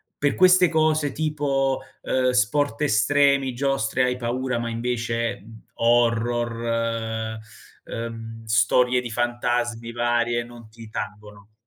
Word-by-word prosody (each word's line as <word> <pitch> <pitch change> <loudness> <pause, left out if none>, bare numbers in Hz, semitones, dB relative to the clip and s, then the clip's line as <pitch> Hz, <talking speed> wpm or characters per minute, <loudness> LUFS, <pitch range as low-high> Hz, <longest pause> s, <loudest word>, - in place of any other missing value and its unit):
per 145 -1 0
queste 185 -1 +6
cose 155 -3 +2
tipo, 140 -3 -1 0.2
ehm, 130 -1 +1
sport 125 +1 +1
estremi, 140 +2 +3
giostre, 130 -2 0
hai 125 0 +1
paura 125 0 -2
ma 115 0 -3
invece, 115 -2 -2
uhm, 110 0 -14
horror, 115 -1 0 0.5
ehm, 115 -1 -7
storie 125 +3 +3
di 120 - -6
fantasmi 120 0 -1
varie 120 0 0
non 120 -2 -13
ti 115 0 -12
tangono? 105 0 -8
120 Hz, 115 wpm, -24 LUFS, 115-130 Hz, 0.5 s, queste